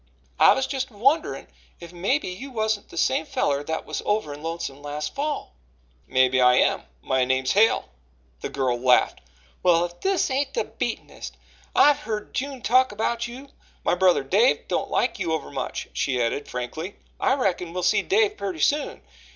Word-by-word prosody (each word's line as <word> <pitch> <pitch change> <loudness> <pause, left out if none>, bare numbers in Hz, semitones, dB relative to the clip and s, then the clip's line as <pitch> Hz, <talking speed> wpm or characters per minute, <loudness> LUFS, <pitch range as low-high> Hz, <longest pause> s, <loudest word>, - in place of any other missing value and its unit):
"I - - +8
was 265 - 0
just 265 -1 -3
a 225 - -20
wonderin' 275 +9 +1 0.3
if 170 0 -11
mebbe 200 - 0
you 195 +10 -6
wasn't 220 -4 -2
the - - -11
same 155 -1 +2
feller 140 -2 -1
that 160 +2 -4
was - - -4
over 205 -8 -1
in 145 - -10
Lonesome 165 -4 -5
last 145 +1 -4
fall." 290 - -3 0.5
"Maybe 130 0 +3
I 125 0 +6
am - - +2 0.2
my 130 - +1
name's 130 +1 +1
Hale." 220 +3 +3 0.5
The - - -5
girl 130 -3 -1
laughed. 125 0 +3 0.4
"Well, 175 -1 +4
if 175 0 -10
this 380 -7 +1
ain't 270 +1 -1
the 470 - +1
beatenest! - - -6 0.4
I've 290 -1 +5
heerd 215 -1 -4
June 270 -2 -4
talk 255 +3 +4
about 230 +3 -1
you. 260 +4 -10 0.3
My - - +2
brother 180 -4 +3
Dave 205 - +2
don't - - -1
like 235 -3 0
you 170 -4 -1
overmuch," 140 -4 -4
she 130 -3 -1
added 120 +4 -1
frankly. 155 +10 -5 0.2
"I 265 - +2
reckon 180 -9 -1
we'll 180 +1 -4
see - - +3
Dave 420 +1 +2
purty 190 -4 -4
soon. 285 - 0
185 Hz, 175 wpm, -24 LUFS, -, 0.5 s, I